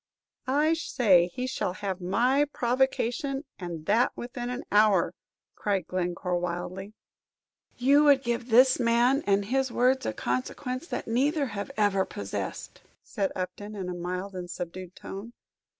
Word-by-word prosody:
"I 295 Hz, +4 st, +3 dB
say 200 Hz, -, +3 dB
he 250 Hz, 0 st, -3 dB
shall 255 Hz, -8 st, -2 dB
have 190 Hz, -1 st, -4 dB
my 245 Hz, +10 st, +2 dB
provocation, 265 Hz, +2 st, 0 dB, 0.2 s
and 170 Hz, -4 st, -6 dB
that 225 Hz, +6 st, +3 dB
within 240 Hz, 0 st, -5 dB
an 250 Hz, +1 st, -4 dB
hour!" 205 Hz, -5 st, +4 dB, 0.4 s
cried 195 Hz, -4 st, -1 dB
Glencore, 180 Hz, 0 st, -2 dB
wildly. 180 Hz, +3 st, -4 dB, 0.8 s
"You 280 Hz, +4 st, +5 dB
would 280 Hz, -2 st, +5 dB
give 235 Hz, 0 st, -2 dB
this 255 Hz, +3 st, +6 dB
man 240 Hz, +3 st, +3 dB
and 200 Hz, 0 st, +3 dB
his 265 Hz, +3 st, 0 dB
words 255 Hz, +2 st, +2 dB
a 110 Hz, -, -1 dB
consequence 250 Hz, -, -3 dB
that -, -, -4 dB
neither 280 Hz, +6 st, +1 dB
have 205 Hz, -3 st, -5 dB
ever 200 Hz, -2 st, +3 dB
possessed," 100 Hz, -, -6 dB, 0.2 s
said 195 Hz, -2 st, -2 dB
Upton, 205 Hz, +3 st, -5 dB
in 190 Hz, -3 st, -4 dB
a -, -, -3 dB
mild 180 Hz, +3 st, -4 dB
and 180 Hz, -1 st, -6 dB
subdued 180 Hz, +1 st, -7 dB
tone. 205 Hz, +5 st, -8 dB
210 Hz, 145 wpm, -28 LUFS, 185-255 Hz, 0.8 s, this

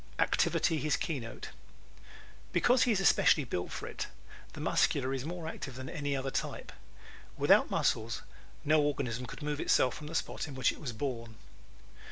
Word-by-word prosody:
Activity 160 Hz, -2 st, +2 dB
His 150 Hz, 0 st, +1 dB
Keynote 130 Hz, -9 st, -4 dB, 0.5 s
¶ -, -, -23 dB, 0.5 s
Because 250 Hz, 0 st, +4 dB
he 245 Hz, -, +3 dB
is 205 Hz, -, +2 dB
especially 170 Hz, -5 st, +5 dB
built 90 Hz, -8 st, -3 dB
for -, -, -5 dB
it -, -, -5 dB, 0.5 s
the -, -, -9 dB
Muscular 135 Hz, -1 st, +2 dB
is 135 Hz, 0 st, -3 dB
more 170 Hz, 0 st, -5 dB
active 135 Hz, -5 st, -6 dB
than 130 Hz, 0 st, -6 dB
any 145 Hz, -4 st, -2 dB
other 135 Hz, 0 st, -2 dB
type. -, -, -3 dB, 0.7 s
Without -, -, +5 dB
muscles 115 Hz, +1 st, 0 dB, 0.4 s
no 155 Hz, +1 st, +5 dB
organism 125 Hz, -4 st, -1 dB
could 150 Hz, -, -8 dB
move 150 Hz, 0 st, -2 dB
itself 130 Hz, -5 st, +3 dB
from 150 Hz, -, -8 dB
the 165 Hz, -, -6 dB
spot -, -, -2 dB
in 140 Hz, -, -8 dB
which 130 Hz, -2 st, +3 dB
it -, -, -12 dB
was 135 Hz, -6 st, -3 dB
born. 115 Hz, -2 st, -4 dB
140 Hz, 175 wpm, -32 LUFS, 125-155 Hz, 0.7 s, especially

